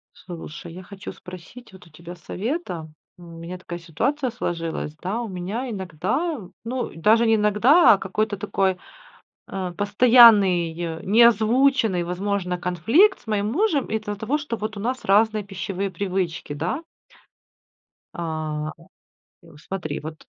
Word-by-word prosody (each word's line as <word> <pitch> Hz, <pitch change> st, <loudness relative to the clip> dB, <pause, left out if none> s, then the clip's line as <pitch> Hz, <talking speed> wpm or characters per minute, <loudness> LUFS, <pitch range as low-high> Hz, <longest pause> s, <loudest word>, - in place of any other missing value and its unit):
Слушай, 170 Hz, -2 st, -9 dB
я 185 Hz, +2 st, -9 dB
хочу 195 Hz, +2 st, -9 dB
спросить 185 Hz, +6 st, -12 dB
вот 185 Hz, -, -15 dB
у -, -, -19 dB
тебя 170 Hz, +3 st, -11 dB
совета, 180 Hz, -, -5 dB, 0.3 s
м, 170 Hz, -1 st, -12 dB
у -, -, -11 dB
меня 170 Hz, +2 st, -7 dB
такая 175 Hz, -1 st, -8 dB
ситуация 250 Hz, -, -1 dB
сложилась, 165 Hz, -9 st, -4 dB
да, 195 Hz, +9 st, -3 dB
у 235 Hz, -, -4 dB
меня 195 Hz, +8 st, -4 dB
иногда, 200 Hz, -, -2 dB, 0.3 s
ну 250 Hz, +1 st, -3 dB
даже 220 Hz, +8 st, +4 dB
не 225 Hz, -1 st, +4 dB
иногда, 220 Hz, -, +5 dB
а -, -, +2 dB
какой-то 205 Hz, +2 st, -2 dB
такой, 195 Hz, -2 st, 0 dB, 0.7 s
а, 185 Hz, -2 st, -4 dB
постоянный, 195 Hz, -6 st, +4 dB
не 215 Hz, +5 st, +5 dB
озвученный, 230 Hz, -3 st, +3 dB
возможно, 180 Hz, 0 st, -2 dB
конфликт 225 Hz, -, +3 dB
с -, -, -24 dB
моим 210 Hz, 0 st, -1 dB
мужем 330 Hz, -, +1 dB
из-за 210 Hz, -1 st, -3 dB
того, 220 Hz, +8 st, -1 dB
что 285 Hz, -6 st, -4 dB
вот 215 Hz, -1 st, -5 dB
у -, -, -5 dB
нас 255 Hz, +4 st, -3 dB
разные 215 Hz, +1 st, +3 dB
пищевые 195 Hz, 0 st, -4 dB
привычки, 185 Hz, -6 st, -3 dB
да? 170 Hz, -, -3 dB, 1.3 s
А, 155 Hz, -2 st, -4 dB, 0.7 s
и -, -, -18 dB
у 150 Hz, -, -16 dB
смотри, 160 Hz, -2 st, -5 dB
вот, 155 Hz, +1 st, -7 dB
195 Hz, 145 wpm, -23 LUFS, 175-225 Hz, 1.3 s, иногда